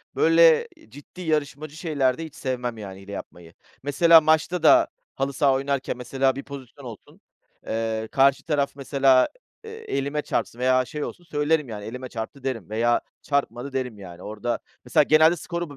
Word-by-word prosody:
böyle 165 -1 +5 0.2
ciddi 145 +8 -13
yarışmacı 155 -2 -2
şeylerde 155 -3 0
hiç 155 - -12
sevmem 125 -3 -3
yani 95 -2 -9
hile 100 +1 -11
yapmayı. 85 -4 -9 0.3
Mesela 165 +4 +6
maçta 160 +2 +1
da - - +6 0.3
halı 135 +1 -2
saha 135 +1 +3
oynarken 135 -1 -2
mesela 130 +2 0
bir 140 - -6
pozisyon 140 -1 -11
olsun, 115 -4 -12 0.5
ııı, 110 0 -2
karşı 135 +2 +3
taraf 145 -3 0
mesela, 135 -2 +3 0.4
ııı, 445 - -8
elime 150 - -3
çarpsın 120 - -3
veya 130 0 +3
şey 150 +3 -5
olsun, 175 - -7
söylerim 150 -3 0
yani 105 -2 -7
"elime 125 +2 -7
çarptı" 115 +4 -7
derim 115 -9 -4
veya 120 +2 +1 0.2
"çarpmadı" 140 -2 -2
derim. 125 -4 -3
Yani 90 -2 -11
orada 110 +3 -3 0.3
mesela 125 +4 +4
genelde 155 +3 +5
skoru 170 0 -5
135 Hz, 160 wpm, -24 LUFS, 120-150 Hz, 0.5 s, Mesela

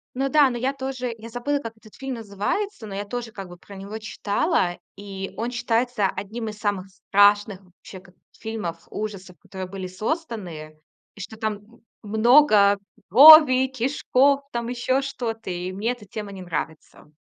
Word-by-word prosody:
Ну 270 +1 -1
да, 290 -1 +5
но 240 - -4
я 265 +3 -1
тоже 260 -2 -4
я 230 +1 -10
забыла, 250 +5 -2
как 230 -4 -8
этот 215 -1 -18
фильм 270 -1 -5
называется, 225 - -3
но 200 - -8
я 200 +1 -3
тоже 235 +1 -6
как 195 -3 -8
бы 175 - -12
про 200 - -14
него 200 +3 -7
читала. 215 - -1 0.2
И 195 -1 -7
он 230 +2 -2
считается 240 -2 0
одним 220 +4 -5
из 210 0 -10
самых 200 -3 -2
страшных, 205 +1 +3
вообще, 185 +1 -14
как 185 -1 -20 0.2
фильмов 210 -7 -6
ужасов, 195 -5 -6
которые 190 -1 -8
были 190 -1 -6
созданы. 185 - -5 0.4
И - - -15
что 220 - -8
там, 220 -1 -2
м, 210 +3 -19 0.2
много 215 -2 +5 0.3
крови, 275 -2 +9
кишков, 270 +2 +1
там 235 -1 -3
ещё 250 +2 0
что-то. 230 -6 -5
И 180 +1 -4
мне 210 +6 -2
эта 240 -4 -8
тема 205 +1 -7
не 190 -2 -9
нравится. 160 -3 -6
215 Hz, 170 wpm, -23 LUFS, 195-250 Hz, 0.4 s, крови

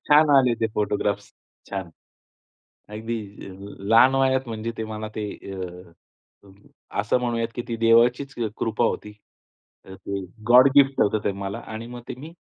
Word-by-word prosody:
छान 150 0 +6
आले 125 -3 +4
ते 115 - +3
फोटोग्राफ्स. 100 -1 -1 0.3
छान. 95 -4 -5 1.0
अगदी 110 +2 -4 0.3
अ, - - -10 0.3
लहान 115 +6 +5
वयात 130 -1 +2
म्हणजे 115 0 -4
ते 110 - -2
मला 110 0 -5
ते 105 -1 -3 0.3
अ, 90 -1 -8 1.1
असं 105 +5 +1
म्हणूयात 115 -2 -1
की 120 - -2
ती 115 - -2
देवाचीच 120 +4 +3
अ, 115 - 0
कृपा 115 +1 0
होती. 105 - -2 0.8
ते 95 +1 -6 0.3
गॉड 125 +3 +8
गिफ्ट 135 -1 +5
होतं 105 +1 +2
ते 100 - +1
मला 100 0 -5
आणि 110 +1 -6
मग 120 0 -8
ते - - -5
मी 160 +4 -10
115 Hz, 155 wpm, -24 LUFS, 100-125 Hz, 1.1 s, गॉड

